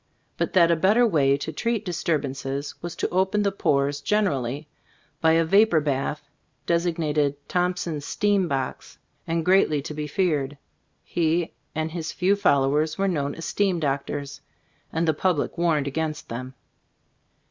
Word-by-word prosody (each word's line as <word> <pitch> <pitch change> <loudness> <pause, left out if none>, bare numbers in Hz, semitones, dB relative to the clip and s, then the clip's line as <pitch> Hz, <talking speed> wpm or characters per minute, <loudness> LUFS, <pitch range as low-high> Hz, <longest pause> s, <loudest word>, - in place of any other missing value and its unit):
But - - -2
that 170 -2 +5
a - - +4
better 205 +9 +4
way 140 -9 +3
to 155 +3 -5
treat 230 +6 -1
disturbances 140 -5 -2
was 175 -1 -5
to - - -1
open 190 +3 +1
the 200 - +1
pores 140 -6 0
generally, 145 - 0 0.5
by 160 0 +5
a 165 0 +3
vapor 195 -1 +5
bath— 145 0 -2 0.4
designated 160 -4 +1
"Thompson's 180 -4 -1
Steam 200 +2 +1
Box," 135 -3 -4 0.3
and 165 -1 -1
greatly 180 -5 +4
to 150 - -6
be 150 0 -4
feared. 150 -4 0 0.5
He 165 0 0 0.2
and 160 0 -2
his 165 -1 -4
few 190 +3 +2
followers 150 -3 +2
were 195 0 +1
known 145 -6 -1
as 165 - -7
"Steam 195 -4 +1
Doctors" 140 -1 -3 0.3
— - - -39
and 165 +1 0
the 160 - +4
public 160 -1 0
warned 165 -4 +1
against 155 +2 -3
them. 130 +3 -6
160 Hz, 150 wpm, -25 LUFS, 145-180 Hz, 0.5 s, that